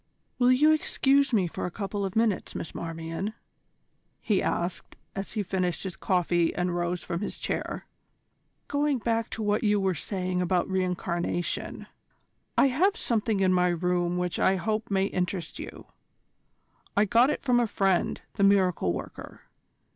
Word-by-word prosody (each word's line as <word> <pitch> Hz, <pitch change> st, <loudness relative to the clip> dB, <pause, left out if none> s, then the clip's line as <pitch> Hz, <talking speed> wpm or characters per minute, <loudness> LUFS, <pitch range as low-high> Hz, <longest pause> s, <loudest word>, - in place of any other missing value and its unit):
"Will 250 Hz, 0 st, +5 dB
you 295 Hz, +5 st, +5 dB
excuse 280 Hz, -3 st, +2 dB
me 205 Hz, -6 st, +3 dB
for 170 Hz, -, -4 dB
a -, -, -3 dB
couple 200 Hz, +2 st, -4 dB
of 190 Hz, -1 st, -3 dB
minutes, 225 Hz, -3 st, +1 dB
Miss -, -, -5 dB
Marmion?" 165 Hz, +5 st, -4 dB, 0.8 s
he 205 Hz, -4 st, +1 dB
asked, 175 Hz, 0 st, -2 dB, 0.2 s
as 195 Hz, 0 st, -5 dB
he 215 Hz, -2 st, -1 dB
finished 180 Hz, -2 st, -1 dB
his 190 Hz, -3 st, -5 dB
coffee 175 Hz, -2 st, +1 dB
and 180 Hz, 0 st, -1 dB
rose 175 Hz, 0 st, -1 dB
from 170 Hz, +2 st, -3 dB
his 210 Hz, -, -3 dB
chair. -, -, -3 dB, 0.8 s
"Going 290 Hz, -1 st, +1 dB
back 230 Hz, -1 st, -1 dB
to 220 Hz, -, -4 dB
what 210 Hz, +1 st, +1 dB
you 210 Hz, -1 st, +3 dB
were 190 Hz, -1 st, +1 dB
saying 180 Hz, +2 st, -2 dB
about 180 Hz, 0 st, +1 dB
re 190 Hz, -1 st, +1 dB
incarnation: 175 Hz, -1 st, -2 dB, 0.7 s
I 275 Hz, -, +6 dB
have 375 Hz, -, +2 dB
something 220 Hz, -3 st, 0 dB
in 185 Hz, -1 st, +4 dB
my 180 Hz, 0 st, +3 dB
room 175 Hz, 0 st, 0 dB
which 180 Hz, -1 st, -1 dB
I 190 Hz, -, +4 dB
hope 215 Hz, +4 st, -2 dB
may 195 Hz, -1 st, +2 dB
interest 180 Hz, -3 st, -3 dB
you. -, -, -8 dB, 1.1 s
I 205 Hz, -, +5 dB
got 235 Hz, +6 st, +4 dB
it -, -, -2 dB
from 250 Hz, -3 st, +3 dB
my 240 Hz, -1 st, +3 dB
friend, 195 Hz, -3 st, +1 dB, 0.2 s
the 200 Hz, -, +2 dB
miracle 185 Hz, -, +3 dB
worker. -, -, -8 dB
190 Hz, 160 wpm, -27 LUFS, 180-220 Hz, 1.1 s, I